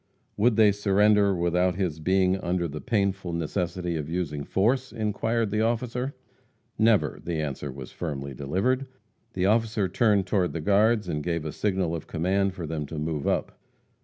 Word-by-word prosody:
Would 110 +2 +3
they 110 -2 +6
surrender 100 0 +3
without 90 +1 +1
his 90 -5 -2
being 95 +3 +2
under 90 -1 -1
the 75 0 -6
painful 100 -6 -1
necessity 85 +1 -2
of 75 -1 -4
using 80 -4 -2
force, 125 - +1
inquired 110 0 -1
the 105 +1 +1
officer. 120 +3 -1 0.6
"Never!" 110 -2 +3
The 85 -2 -2
answer 70 -2 -3
was 65 -1 -9
firmly 70 -5 -5
delivered. 100 - -1 0.5
The 90 0 0
officer 110 -1 +2
turned 100 0 +2
to 90 -1 +1
the 85 - -5
guards, 105 +4 +3
and 75 -3 -2
gave 85 0 -2
a 75 - -3
signal 95 -4 -1
of 80 - -7
command 95 +3 0
for 85 - -5
them 75 -2 -4
to 80 - -7
move 75 -1 -2
up. - - -1
95 Hz, 165 wpm, -26 LUFS, 80-105 Hz, 0.6 s, they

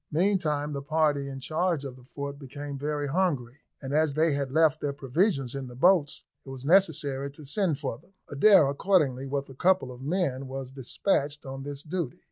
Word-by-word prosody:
Meantime 155 -4 +1
the 140 - -3
party 145 -2 +1
in 135 -1 -6
charge 155 +1 -1
of 130 -2 -6
the 130 - -16
fort 140 +2 -6
became 145 +1 -7
very 145 +1 -2
hungry, 140 -6 -1 0.2
and 135 +1 -4
as 155 -2 +2
they 160 0 +3
had 140 -2 -2
left 155 -1 +3
their 145 -1 -1
provisions 140 - 0
in 135 -1 -5
the 125 - -10
boats, 165 +1 +3 0.2
it - - -12
was 135 0 -8
necessary 145 -6 +2
to 145 +2 -13
send 170 0 0
for 135 -5 -4
them. 195 - -26
Adair 155 +1 +6
accordingly, 140 -4 +1
with 140 0 -2
a 135 - -11
couple 180 -2 +2
of 125 0 -11
men, 140 -4 -1
was 130 -1 -6
despatched 140 +2 -1
on 135 0 -6
this 145 +1 -6
duty. 165 -5 -4
145 Hz, 195 wpm, -27 LUFS, 135-160 Hz, 0.2 s, Adair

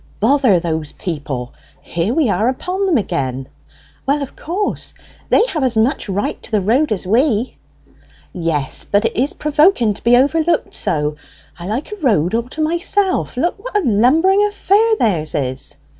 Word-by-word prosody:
"Bother 245 -4 +3
those 160 -3 -3
people! 140 -7 -5 0.3
Here 170 +5 -2
we 290 +1 +2
are 210 +4 +1
upon 365 +9 -2
them 340 -6 +3
again." 135 - -3 0.6
"Well, 285 +1 +1
of 270 - -9
course. 385 +6 -4 0.3
They 445 - +4
have 310 -6 -2
as 245 -3 +1
much 225 0 +1
right 200 +2 -2
to - - -8
the 215 -3 +1
road 240 +9 +1
as 200 -4 -2
we." 235 +3 +1 0.7
"Yes, 165 -6 0
but 205 +2 +1
it 225 - -1
is 270 +5 +1
provoking 295 - +2
to - - -11
be 240 +1 +5
overlooked 320 +5 +1
so. 150 0 -1 0.4
I 170 - -7
like 235 - -3
a 420 - -6
road 185 - +2
all 235 +2 -1
to 310 - -5
myself. 345 0 0
Look 345 +8 -1
what - - -2
a 400 - 0
lumbering 315 - +3
affair 415 +2 +2
theirs 170 - 0
is!" 130 -2 -2
240 Hz, 170 wpm, -17 LUFS, -, 0.7 s, be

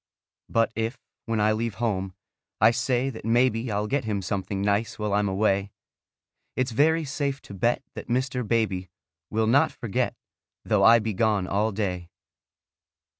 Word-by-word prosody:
But 115 0 +2
if, 115 +3 -2 0.3
when 115 -1 0
I 105 +1 +3
leave 110 -1 -1
home, 95 -5 -2 0.4
I 110 +3 +6
say 125 +2 0
that 110 - -10
maybe 115 0 +2
I'll 105 +1 0
get 140 +5 0
him 105 -3 -2
something 95 +1 -3
nice 100 +3 0
while 105 -2 -2
I'm 100 0 +2
away, 100 0 +1 0.9
It's 130 -1 0
very 160 +6 +3
safe 140 0 -2
to - - -11
bet 120 +7 0
that - - -8
Mr. 125 +1 0
Baby 105 -6 0 0.4
Will 110 +1 +1
not 140 +8 +4
forget, 115 -5 -2 0.5
though - - +2
I 115 +1 +8
be 110 -1 -2
gone 105 -1 +1
all 105 +4 0
day. 90 -4 -3
110 Hz, 160 wpm, -26 LUFS, 100-120 Hz, 0.9 s, I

